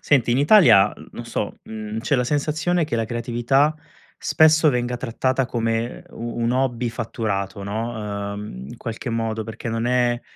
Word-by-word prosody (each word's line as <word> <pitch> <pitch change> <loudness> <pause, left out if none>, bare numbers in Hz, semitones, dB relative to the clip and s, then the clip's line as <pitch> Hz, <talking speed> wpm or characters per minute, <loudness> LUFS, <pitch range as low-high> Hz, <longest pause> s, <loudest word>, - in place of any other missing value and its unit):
Senti, 125 -5 +2
in 125 - +2
Italia, 145 - +6
uhm, - - -13
no - - -7
so, - - -4
mhmm, 110 0 -6
c'è 140 - 0
la 125 - +1
sensazione 155 +5 0
che 135 -6 -2
la 115 - 0
creatività, 120 +6 +1 0.4
spesso, 155 0 +4
venga 125 0 -1
trattata 130 +1 -1
come 115 0 -2
u 120 +1 -6
un 115 - +1
hobby 125 -2 0
fatturato 105 -4 -3
no, 105 -1 -4
uhm, 70 -11 -7
in - - -9
qualche 115 +1 -5
modo, 115 -1 -2
perché 110 +1 -6
non 115 +1 -1
è, 120 -1 +2
120 Hz, 170 wpm, -22 LUFS, 110-130 Hz, 0.4 s, Italia